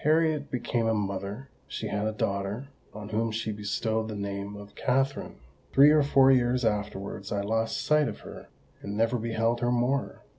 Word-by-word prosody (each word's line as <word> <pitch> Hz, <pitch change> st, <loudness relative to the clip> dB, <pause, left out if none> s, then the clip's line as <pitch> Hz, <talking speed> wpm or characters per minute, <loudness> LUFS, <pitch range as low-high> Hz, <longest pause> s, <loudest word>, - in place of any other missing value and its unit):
"Harriet 155 Hz, -1 st, +2 dB
became 120 Hz, -2 st, -1 dB
a 115 Hz, -, +2 dB
mother: 100 Hz, +4 st, -3 dB, 0.2 s
she -, -, -4 dB
had 105 Hz, +1 st, -1 dB
a -, -, 0 dB
daughter, 100 Hz, +4 st, -2 dB, 0.2 s
on 105 Hz, 0 st, -8 dB
whom 115 Hz, +1 st, 0 dB
she 110 Hz, 0 st, -2 dB
bestowed 110 Hz, +2 st, -1 dB
the 110 Hz, -, -5 dB
name 100 Hz, 0 st, -4 dB
of 100 Hz, 0 st, -11 dB
Katherine. 135 Hz, +2 st, 0 dB, 0.4 s
Three 140 Hz, +3 st, +8 dB
or 155 Hz, 0 st, +5 dB
four 135 Hz, -1 st, +5 dB
years 125 Hz, -1 st, +2 dB
afterwards 105 Hz, -2 st, -2 dB
I 100 Hz, -, 0 dB
lost 110 Hz, +2 st, -1 dB
sight 150 Hz, -1 st, +4 dB
of -, -, -6 dB
her, -, -, -10 dB, 0.3 s
and 100 Hz, +1 st, -5 dB
never 115 Hz, +2 st, +2 dB
beheld 115 Hz, +1 st, 0 dB
her 120 Hz, 0 st, +1 dB
more. 125 Hz, +3 st, 0 dB
115 Hz, 180 wpm, -28 LUFS, 105-130 Hz, 0.4 s, Three